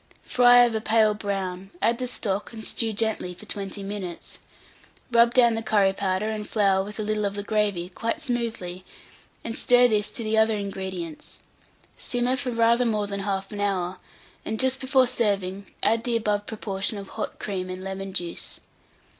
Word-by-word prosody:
Fry 245 0 +6
of 235 - -1
a 220 - -1
pale 220 -1 +4
brown, 195 -2 -3
add 230 +2 +2
the 255 - -2
stock, 205 -4 -2
and 220 -1 -7
stew 225 -1 0
gently 215 -4 -1
for 215 - -10
20 200 -1 -4
minutes; 195 -4 -6 0.7
rub 235 0 +6
down 240 -2 +5
the 225 - -1
curry 205 -3 +3
powder 195 +1 -1
and 215 -1 -4
flour 195 -3 +3
with 210 +2 -8
a - - -1
little 215 0 -1
of 200 0 -1
the 205 - -3
gravy, 205 -4 0
quite 225 - -3
smoothly, 230 - -3 0.6
and 230 - -4
stir 245 0 +5
this 210 -2 +1
to 230 - -6
the 220 0 0
other 220 0 +4
ingredients; 190 -5 -5 0.6
simmer 245 +1 0
for 265 -1 -3
rather 235 +1 +3
more 215 -3 +1
than 200 -1 -4
1/2 195 +1 -3
hour, 185 -2 -1 0.5
and 220 +1 -3
just 260 0 +2
before 260 -1 +4
serving, 200 -5 0 0.2
add 225 +2 +3
the 235 -1 +1
above 210 -2 -1
proportion 205 -1 -3
of 195 -1 -8
hot 220 - -5
cream 185 -3 -4
and 185 0 -6
lemon 195 0 -5
juice. 175 -3 -5
210 Hz, 180 wpm, -25 LUFS, 195-230 Hz, 0.7 s, Fry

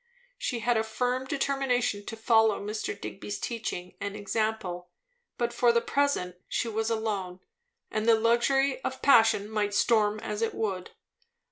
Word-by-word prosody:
She 240 -3 -2
had 240 +1 +2
a 220 - +2
firm 250 +3 -1
determination 265 -6 0
to 225 - -4
follow 220 -1 +3
Mr. 210 0 -4
Digby's 205 +1 -6
teaching 180 -6 -4
and 200 0 -3
example; 205 -4 -2 0.5
but 240 0 -1
for 240 -1 +4
the 235 - +3
present 235 -10 0
she - - -1
was 220 0 -1
alone, 205 -5 -2 0.5
and 215 +1 -1
the 230 - +7
luxury 260 +4 +2
of 260 - -4
passion 225 -6 +5
might 210 -1 -1
storm 215 -2 +3
as 210 -1 -4
it 225 - -1
would. 190 -4 -2
220 Hz, 150 wpm, -28 LUFS, 205-240 Hz, 0.5 s, the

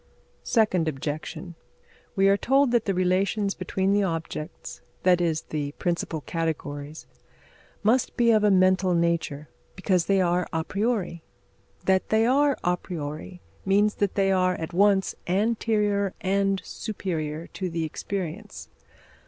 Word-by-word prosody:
Second 200 -8 +2
objection: 155 +4 -4 0.6
we 195 -1 +4
are 195 - +5
told 270 +4 +2
that 240 -2 +2
the 195 - +1
relations 195 +3 +1
between 190 +1 -1
the 205 - +3
objects 165 -3 -5 0.2
that 180 -1 +4
is, 160 -2 0
the 145 -2 -3
principal 170 -2 -2
categories 155 -2 -4 0.8
must 230 +4 +2
be 235 -1 +4
of 215 -2 +3
a 210 - +5
mental 185 -1 +3
nature, 170 -3 0 0.3
because 185 -2 +1
they 195 -1 +3
are 180 -1 +1
a 160 0 -1
priori. 195 -3 -1 0.6
That 190 0 +2
they 220 +1 +3
are 280 +3 +3
a 180 0 +2
priori 160 +1 -7 0.2
means 205 +2 +3
that 200 -2 +1
they 195 -1 +2
are 185 -1 +2
at 160 0 -6
once 195 +1 +3
anterior 205 0 +1
and 195 0 0
superior 165 -6 -4
to 185 -2 -3
the 165 -1 -2
experience. 190 +5 -5
185 Hz, 135 wpm, -26 LUFS, 165-205 Hz, 0.8 s, are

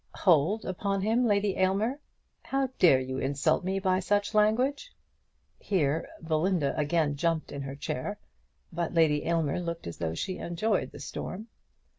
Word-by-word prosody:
"Hold 180 +4 +3
upon 195 +1 -1
him, 230 +4 +2
Lady 200 -2 +2
Aylmer! 200 +8 +1 0.4
How 270 -1 -1
dare 150 -8 +6
you 130 0 -4
insult 140 +6 +1
me 190 +2 -1
by 185 -1 +1
such 205 +3 0
language?" 250 - +2 0.7
Hereupon 160 -6 0 0.2
Belinda 160 -2 +1
again 150 -1 +1
jumped 165 +1 -1
in 140 - -5
her 135 0 -6
chair; 155 +6 -4 0.6
but 170 0 -2
Lady 155 -3 +3
Aylmer 165 -2 +1
looked 170 -1 -4
as 85 - -6
though 80 -1 -2
she 185 - -3
enjoyed 190 +5 -1
the - - -11
storm. 215 +5 -6
180 Hz, 150 wpm, -29 LUFS, 150-205 Hz, 0.7 s, dare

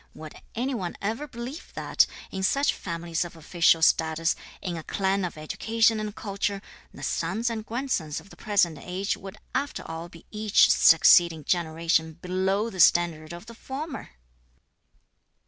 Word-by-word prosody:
Would 155 -1 -9 0.2
any 255 +4 -1
one 185 -8 -4
ever 225 +9 -3
believe 250 +5 -8
that - - +2 0.2
in 190 - -4
such 275 +9 +2
families 170 -1 -3
of 175 -1 -9
official 165 0 +2
status, 160 +1 +3 0.2
in 180 -3 -4
a 165 - -5
clan 195 +3 -1
of 175 -3 -4
education 225 +8 +1
and 215 0 -5
culture, 200 -1 -3 0.3
the - - -11
sons 215 +8 -1
and 220 -1 -4
grandsons 220 - -2
of 200 - -17
the - - -13
present 195 -7 +1
age 185 +2 -2
would 195 0 -10 0.2
after 285 +1 -2
all 165 +1 -6
be 165 -1 -15
each 215 -1 +4
(succeeding) 165 -1 +6
generation 160 0 0
below 190 +6 -1
the 185 - -9
standard 165 -2 +4
of 175 +4 -9
the 230 - -11
former?" 270 +5 -6
185 Hz, 155 wpm, -26 LUFS, 165-220 Hz, 0.3 s, succeeding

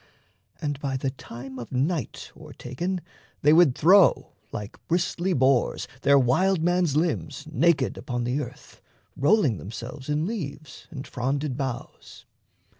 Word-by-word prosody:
And 145 -2 -3
by 135 -2 -2
the 130 0 -2
time 130 0 -9
of 120 - -8
night 140 - -2
O'ertaken, 175 +9 -5 0.4
they 150 +2 +6
would 160 -6 +6
throw, 185 +3 +5 0.2
like 105 0 -7
bristly 175 +2 0
boars, 130 -4 +2
Their 140 0 +5
wildman's 175 +4 +2
limbs 150 -2 -1
naked 170 0 +2
upon 120 -4 -3
the 125 +5 0
earth, 125 - -10 0.3
Rolling 140 - +3
themselves 120 - -8
in 150 +2 +1
leaves 155 - -6
and 140 -5 -7
fronded 135 +2 -2
boughs. 130 -3 -6
140 Hz, 125 wpm, -26 LUFS, 130-170 Hz, 0.4 s, they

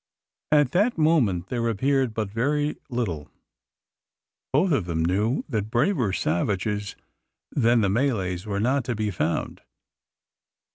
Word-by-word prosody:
At 145 -4 +4
that 205 - +2
moment 120 - +2
there 115 -2 0
appeared 130 +1 +1
but 105 -3 -2
very 145 +7 0
little. 95 - -3 1.2
Both 165 +7 +3
of 135 - +1
them 80 -2 -1
knew 105 +8 +1
that 110 -6 -2
braver 125 - +1
savages 100 +4 -1 0.6
than 120 -3 +3
the 100 - +2
Malays 100 -6 0
were 100 -1 -2
not 130 +5 +1
to 120 - -2
be 105 -1 -1
found. 85 -2 -2
115 Hz, 130 wpm, -25 LUFS, 100-135 Hz, 1.2 s, At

